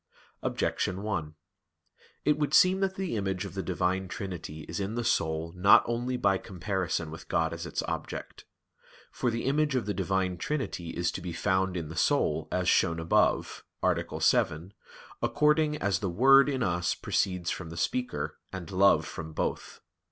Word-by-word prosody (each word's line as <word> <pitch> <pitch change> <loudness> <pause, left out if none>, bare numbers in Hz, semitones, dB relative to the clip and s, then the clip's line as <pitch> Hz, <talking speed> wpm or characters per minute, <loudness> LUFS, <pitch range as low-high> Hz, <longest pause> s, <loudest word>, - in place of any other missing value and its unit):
Objection 95 +2 -1
1: 80 -8 -3 0.9
It 150 +1 +3
would 150 0 +1
seem 185 +3 +6
that 190 -1 0
the 190 -10 -3
image 95 -3 -2
of - - -7
the 95 - -3
Divine 95 +1 -1
Trinity 90 -6 -6
is 75 - -6
in 100 +3 -3
the 120 - -1
soul 80 -6 0
not 90 +3 +6
only 120 +2 -2
by 100 -5 +2
comparison 90 -4 -3
with 80 - -10
God 80 0 0
as 85 0 -5
its - - -2
object. - - -5 0.7
For 120 - -1
the 115 0 -2
image 145 +1 +1
of 125 - 0
the 105 - -1
Divine 95 -1 -1
Trinity 130 - -3
is 85 0 -1
to - - -6
be 85 -1 -5
found 95 0 0
in 80 -3 -4
the 80 - -7
soul, - - +1
as - - 0
shown 85 0 +3
above 80 0 +1 0.2
(A. - - +4 0.2
7), 85 +6 +1 0.5
according 150 0 +2
as 100 - 0
the 100 - -2
word 135 +9 +6
in 130 -3 -1
us 90 -2 0
proceeds 90 -3 -1
from 85 -3 -5
the 85 - -8
speaker; 125 +8 -2
and 90 -4 -7
love 95 +1 +4
from 80 0 -7
both. - - -3
95 Hz, 175 wpm, -29 LUFS, 85-120 Hz, 0.9 s, seem